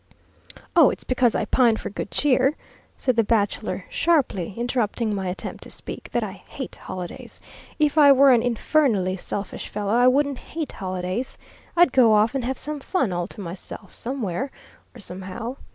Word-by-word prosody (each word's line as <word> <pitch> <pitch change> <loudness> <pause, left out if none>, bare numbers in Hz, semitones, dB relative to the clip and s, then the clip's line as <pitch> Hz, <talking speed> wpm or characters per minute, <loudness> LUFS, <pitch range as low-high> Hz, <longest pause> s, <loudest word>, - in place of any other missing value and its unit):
"Oh, - - +8
it's - - -5
because 250 -2 +2
I - - 0
pine 235 -4 +3
for - - -6
good 205 - -5
cheer," 270 0 +2 0.4
said 255 -3 0
the 230 - +5
bachelor, 205 -2 0
sharply, 250 - +1
interrupting 235 -2 0
my 195 -2 -2
attempt 180 - -5
to - - -11
speak, - - -8
"that 240 - 0
I 210 - -4
hate 250 +6 -8
holidays. 180 -2 -8 0.4
If 305 0 +2
I 285 -1 +8
were 275 0 +7
an 240 -2 +5
infernally 235 -5 +1
selfish 195 +2 -5
fellow, 205 0 -2
I 245 +2 +5
wouldn't 280 +1 +2
hate 320 -2 -5
holidays. 185 +5 -4 0.4
I'd 345 -5 +6
go 235 -4 +6
off 215 +3 +4
and 270 -2 -1
have 260 +2 -2
some 300 0 -3
fun 265 - 0
all 175 0 -2
to 205 - -10
myself, 185 +2 -8
somewhere 250 -1 -3 0.5
or - - -11
somehow. 190 +8 -5
235 Hz, 170 wpm, -24 LUFS, 195-270 Hz, 0.5 s, Oh